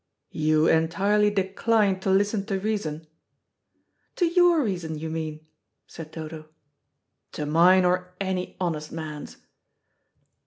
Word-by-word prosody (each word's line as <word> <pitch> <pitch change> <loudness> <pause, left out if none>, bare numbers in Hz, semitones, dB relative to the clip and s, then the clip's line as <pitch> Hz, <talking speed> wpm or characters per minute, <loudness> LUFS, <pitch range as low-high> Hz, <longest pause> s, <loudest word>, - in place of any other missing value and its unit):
"You 155 0 +2
entirely 195 +7 +2
decline 200 0 +1
to 190 - -2
listen 200 +2 +2
to 195 -3 -1
reason?" 175 -7 -3 1.1
"To 355 - +2
your 345 -2 +4
reason, 175 -7 -3
you 160 +1 -5
mean," 155 -1 -5 0.4
said 160 -2 -10
Dodo. 155 -1 -8 0.8
"To 150 - -4
mine 175 +5 +5
or 180 0 0
any 190 -2 -3
honest 160 -4 -3
man's." 155 -2 -7
180 Hz, 115 wpm, -25 LUFS, 160-200 Hz, 1.1 s, mine